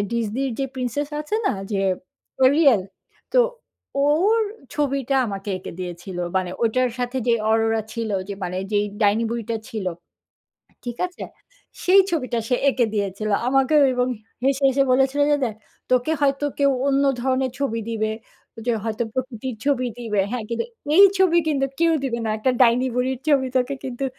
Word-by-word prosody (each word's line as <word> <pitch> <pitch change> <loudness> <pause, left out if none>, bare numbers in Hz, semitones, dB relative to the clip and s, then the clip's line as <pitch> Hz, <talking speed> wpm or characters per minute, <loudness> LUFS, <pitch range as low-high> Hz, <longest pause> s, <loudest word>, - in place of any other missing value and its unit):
এ - - +2
Disney 230 +3 -1
র - - -4
যে 270 - +1
princess 260 +3 -2
আছে 305 +8 -4
না? - - +3 0.2
যে 200 - 0 0.6
'Arial?' 260 - +5 0.5
তো - - +4 0.7
ওর 360 +10 +3 0.4
ছবিটা 275 -2 0
আমাকে 195 0 -6
এঁকে 185 - -8
দিয়েছিল। 180 +1 -6 0.2
মানে 185 -1 0
ওটার 250 +2 +2
সাথে 245 +1 -2
যে - - +5
'Aurora' 225 0 +2
ছিল 230 -2 -3 0.2
যে, 200 - -4
মানে 180 0 -3 0.2
যে 205 - +3 0.2
ডাইনি 205 +2 +3
বুড়িটা 230 -1 -2
ছিল। 215 -5 -4 1.0
ঠিক 240 - -7
আছে? 360 - -9 0.6
সেই 385 +2 +7
ছবিটা 255 -7 -1
সে 250 - +2
এঁকে 245 -2 +2
দিয়েছিল। 205 +1 -2 0.2
আমাকেও 270 +3 +4
এবং 250 0 +1 0.4
হেসে, 275 +1 +1
হেসে 275 +1 +2
বলেছিল 265 +2 +2
যে - - +5
দেখ, 225 -4 -1 0.4
"তোকে 255 +4 +2
হয়তো 275 +1 +2
কেউ 280 -1 +4 0.2
অন্য 275 0 +3 0.2
ধরনের 260 0 0
ছবি 230 -5 -1
দিবে, 220 -1 -1 0.5
যে 240 - +2
হয়তো 225 +1 -1
প্রকৃতির 255 -1 -4
ছবি 255 -3 +1
দিবে। 210 -4 0
হ্যাঁ, 245 -3 -2
কিন্তু 235 - -2 0.3
এই 400 - +10
ছবি 370 -3 +4
কিন্তু 275 -3 +1
কেউ 335 0 +4
দিবে 240 -3 -1
না। 220 - -1
একটা 255 +4 +1
ডাইনি 245 +1 +5
বুড়ির 255 +1 0
ছবি 275 -3 +3
তোকে 255 +2 +1
কিন্তু, 255 0 -5
250 Hz, 165 wpm, -22 LUFS, 225-275 Hz, 1.0 s, এই